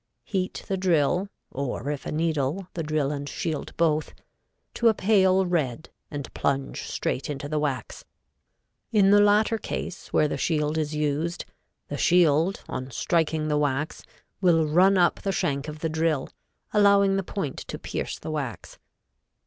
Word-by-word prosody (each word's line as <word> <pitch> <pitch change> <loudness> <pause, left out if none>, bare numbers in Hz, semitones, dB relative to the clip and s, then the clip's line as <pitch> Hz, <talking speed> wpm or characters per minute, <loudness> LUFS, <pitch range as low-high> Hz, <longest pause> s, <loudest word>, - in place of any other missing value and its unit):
Heat 185 -2 -3
the 195 - -1
drill 180 +1 +2 0.2
(or 140 0 -3
if 145 - -5
a - - -3
needle, 160 +2 -1
the 170 - -3
drill 150 -2 0
and 145 -1 -4
shield 155 -3 -4
both), 155 -2 +1 0.6
to 235 - +2
a 220 - +5
pale 190 -2 +4
red 160 -5 -1 0.2
and 145 -2 -6
plunge 140 -1 -1
straight 135 - -2
into 145 0 -4
the 155 +1 -1
wax. 140 -4 -3 0.9
In 200 -3 +5
the 205 0 +7
latter 210 +2 +3
case, 190 - -5
where 155 - +3
the - - -3
shield 150 -2 0
is 155 0 -2
used, 150 +3 -1 0.4
the - - -5
shield, 175 +1 +3
on 130 0 -5
striking 160 +3 0
the 150 -1 +1
wax, 145 +1 -1 0.4
will 165 -4 +4
run 185 +6 +4
up 175 -1 +3
the 195 - -1
shank 145 -7 -1
of 150 0 -7
the 165 - 0
drill, 160 -3 0 0.4
allowing 200 -2 +5
the 195 - +1
point 180 -6 -4
to - - -5
pierce - - -4
the - - -6
wax. 135 - -5
160 Hz, 160 wpm, -26 LUFS, 145-190 Hz, 0.9 s, the